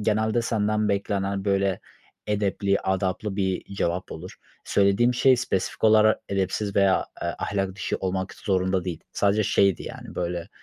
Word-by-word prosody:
genelde 110 +2 +1
senden 110 -1 0
beklenen, 100 -1 -1
böyle, 100 -2 +1 0.5
edepli, 100 -1 0
adaplı 95 +1 -1
bir 95 0 -2
cevap 90 -1 -2
olur. 90 +4 -9 0.3
Söylediğim 100 +5 +3
şey 130 +1 +5
spesifik 120 -6 -2
olarak 110 0 +5
edepsiz 100 +1 -1
veya, 100 -1 +3 0.2
eee, - - -1
ahlak 95 -2 -2
dışı 100 - -2
olmak 95 0 -2
zorunda 95 -2 0
değil. 90 -4 -4
Sadece 100 +1 +2
şeydi, 100 -2 +2
yani, - - -9
böyle, 85 0 -3
100 Hz, 140 wpm, -25 LUFS, 95-105 Hz, 0.5 s, şey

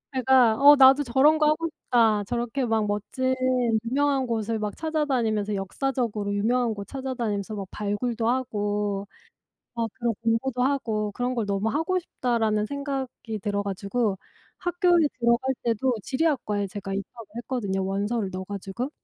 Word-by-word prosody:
제가 255 -3 +4
'어 290 +1 +9
나도 270 +1 +7
저런 275 +5 +4
거 305 -1 +3
하고 310 +2 +1
싶다. 225 -8 +2
저렇게 240 +3 -2
막 220 -2 +1
멋진 255 +6 -1 0.5
유명한 275 +2 +1
곳을 225 -2 -2
막 210 -1 -3
찾아다니면서 250 -10 0
역사적으로 210 0 -2
유명한 230 +3 +1
곳 200 -1 -8
찾아다니면서 235 -6 -3
막 195 -2 -5
발굴도 225 +3 -2
하고 205 -5 -1 0.7
막 230 -1 -1
그런 235 -2 -1
공부도 235 +2 0
하고 225 -6 0
그런 245 +4 -2
걸 230 -3 -1
너무 200 +2 0
하고 325 +8 0
싶다.'라는 225 -10 0
생각이 270 -4 -4
들어 205 0 -1
가지고 200 +1 -1 0.4
학교에 350 -2 +3
들어갈 235 +2 +2
때도 235 +2 +1
지리학과에 255 - 0
제가 195 0 -6
입학을 210 +3 -6
했거든요 205 -6 -2
원서를 200 +2 -1
넣어 185 +1 -5
가지고. 200 +6 -5
235 Hz, 340 characters per minute, -25 LUFS, 205-265 Hz, 0.7 s, 어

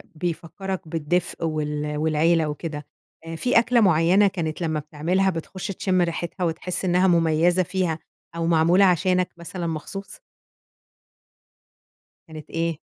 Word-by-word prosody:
بيفكَّرك 175 +2 -4
بِالدِفْء 165 +2 -1
وال 150 -1 -2
والعيلة 160 +1 +2
وكده، 150 -1 -5 0.4
آآ، 165 0 -6
في 245 +6 +3
أكْلة 235 0 +3
مُعينة 185 +2 +4
كانت 170 -4 -3
لمًا 160 -2 -1
بتعملها 165 +6 0
بتخُش 180 +2 -5
تِشِم 185 -1 0
ريحِتْها 170 +1 -2
وتحس 175 +3 -1
إنها 180 +1 +3
مميزة 170 +1 +3
فيها 180 -3 -1 0.4
أو 165 0 -2
معْموْلة 170 +4 +4
عشانك 180 0 +2
مثلًا 170 0 -5
مخصوص؟ 165 +5 -5 2.1
كانت 155 -1 -10
إيه؟ 165 -1 -2
170 Hz, 120 wpm, -23 LUFS, 160-185 Hz, 2.1 s, مُعينة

